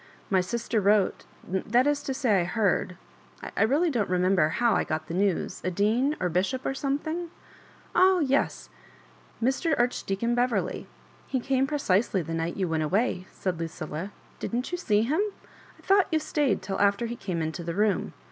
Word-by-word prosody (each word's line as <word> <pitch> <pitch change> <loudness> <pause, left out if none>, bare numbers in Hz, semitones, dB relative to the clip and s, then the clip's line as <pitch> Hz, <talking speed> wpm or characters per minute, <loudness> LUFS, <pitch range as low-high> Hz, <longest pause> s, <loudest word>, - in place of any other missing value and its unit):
" - - -29
My 185 - +5
sister 230 +3 -1
wrote—that 205 +3 +1
is 290 0 +1
to 270 - -3
say 215 -8 +2
I - - +1
heard 180 -1 0 0.3
— - - -12
I - - 0
really 295 +9 +3
don't 225 -8 0
remember 180 -2 +3
how 235 +7 +2
I - - +2
got 155 0 -3
the 165 - -7
news 190 -1 0
a - - 0
dean, 225 - +1
or 180 - 0
bishop, 190 +10 -1
or - - 0
something 305 +5 -2 0.2
?" - - -24
" - - -28
Oh 375 +1 +6
yes, 280 -3 0 0.7
Mr. 270 +6 +1
Archdeacon 235 -2 0
Beverley; 245 0 0 0.4
he 260 - -1
came 265 +1 +1
precisely 210 - +1
the 165 +1 -5
night 165 +1 -2
you 190 -2 0
went 160 -1 0
away," 185 +3 0
said 180 -3 -3
Lucilla 165 +2 -5 0.3
"Didn't 245 +6 -3
you 355 - -1
see 210 - +2
him? 300 - +1 0.6
I - - -21
thought 390 -1 +4
you 320 - +3
stayed 295 -3 0
till 195 - -3
after 200 +3 +3
he 235 +1 -4
came 175 -8 -3
into 160 +3 -4
the 170 0 -4
room. 210 0 +1
215 Hz, 185 wpm, -27 LUFS, 180-265 Hz, 0.7 s, Oh